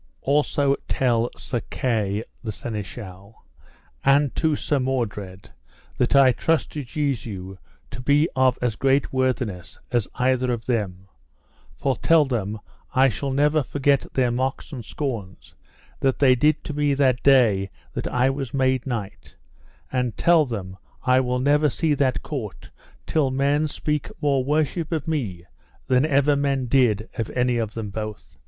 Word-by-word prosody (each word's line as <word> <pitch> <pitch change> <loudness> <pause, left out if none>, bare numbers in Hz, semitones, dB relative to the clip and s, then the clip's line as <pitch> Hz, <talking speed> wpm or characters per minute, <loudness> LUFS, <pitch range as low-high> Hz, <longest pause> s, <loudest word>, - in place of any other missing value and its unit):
Also 140 0 +2
tell 120 -2 +1
Sir 120 -3 -3
Kay 110 -4 -1 0.2
the 110 - -3
Seneschal, 100 - -8 0.6
and 140 0 +3
to 160 -2 +1
Sir 145 0 0
Mordred, 105 -8 -3 0.5
that 125 +3 +2
I 135 -2 +7
trust 160 +5 0
to 150 - -5
Jesu 115 -9 -3 0.4
to - - -7
be 145 +4 +3
of 130 -1 +3
as 120 -4 0
great 135 +2 +1
worthiness 125 -8 -1
as 120 -4 +1
either 130 0 +1
of 115 -1 -3
them, 95 -6 -2 0.7
for 135 -2 0
tell 165 -2 +4
them 110 -5 -2 0.4
I 135 +1 +5
shall 135 +4 -3
never 150 +3 +2
forget 140 +1 0
their 125 -2 +2
mocks 130 +5 -2
and 125 -4 -6
scorns 110 -8 -5 0.5
that 135 -1 +1
they 135 -3 +5
did 150 +5 +2
to 150 - -5
me 145 -1 +1
that 130 -3 +2
day 115 -8 +4 0.2
that - - -3
I 125 +2 +2
was 135 -2 -5
made 130 -1 +1
knight; 115 -6 -5 0.6
and 125 -3 -1
tell 170 -3 +4
them 95 -7 -6 0.3
I 125 0 +4
will 125 -1 0
never 145 +3 +3
see 155 +3 0
that 135 -2 0
court 120 -10 -6 0.3
till 150 -4 +1
men 140 +3 +1
speak 150 0 -2
more 140 -3 +1
worship 155 +3 0
of 160 -3 -2
me 105 - -3 0.4
than 130 +3 +3
ever 145 0 +3
men 140 -2 0
did 115 -4 +2
of 110 - -1
any 125 -1 +2
of 110 -2 -3
them 110 -3 -4
both. 105 - -7
130 Hz, 155 wpm, -23 LUFS, 115-140 Hz, 0.7 s, I